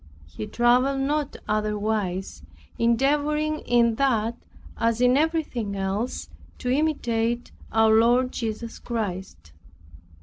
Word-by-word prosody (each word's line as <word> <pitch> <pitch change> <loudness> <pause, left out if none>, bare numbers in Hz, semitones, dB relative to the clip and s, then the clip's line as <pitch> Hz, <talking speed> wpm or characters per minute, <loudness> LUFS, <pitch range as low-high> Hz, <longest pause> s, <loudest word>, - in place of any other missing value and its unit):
He 85 +8 -7
traveled 250 +3 +2
not 290 +1 -1
otherwise, 210 -3 -1 0.4
endeavoring 295 +6 +1
in 235 -1 +3
that, 235 -4 +1 0.4
as 230 0 0
in 250 0 +4
everything 290 -9 0
else, 195 +5 -2 0.3
to 250 - -2
imitate 240 -5 0 0.2
our 220 0 +4
Lord 240 +3 +4
Jesus 225 0 -4
Christ. 190 - -5
235 Hz, 100 wpm, -25 LUFS, 215-270 Hz, 0.4 s, in